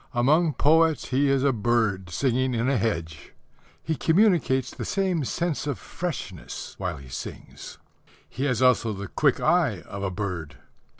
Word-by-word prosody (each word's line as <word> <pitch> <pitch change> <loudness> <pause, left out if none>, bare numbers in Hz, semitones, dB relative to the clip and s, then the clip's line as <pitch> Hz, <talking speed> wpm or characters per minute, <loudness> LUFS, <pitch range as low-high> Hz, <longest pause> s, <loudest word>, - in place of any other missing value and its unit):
Among 150 +6 +3
poets 160 +1 +3
he 135 +2 +2
is 135 -1 +2
a 140 -2 +3
bird 110 -5 0
singing 130 +5 0
in 115 +2 0
a 140 - +2
hedge. 80 -8 -3 0.5
He 160 - -1
communicates 160 - +2
the - - -6
same 190 -5 0
sense 170 +2 -2
of 145 - -2
freshness 145 - -6
while 90 -5 -3
he 70 -1 -12
sings. 60 - -8 0.5
He 135 - -4
has 125 -3 +1
also 120 -3 +3
the 100 0 -6
quick - - +2
eye - - +2
of 100 - -8
a 100 - -1
bird. 90 -6 -5
125 Hz, 160 wpm, -25 LUFS, 100-150 Hz, 0.5 s, Among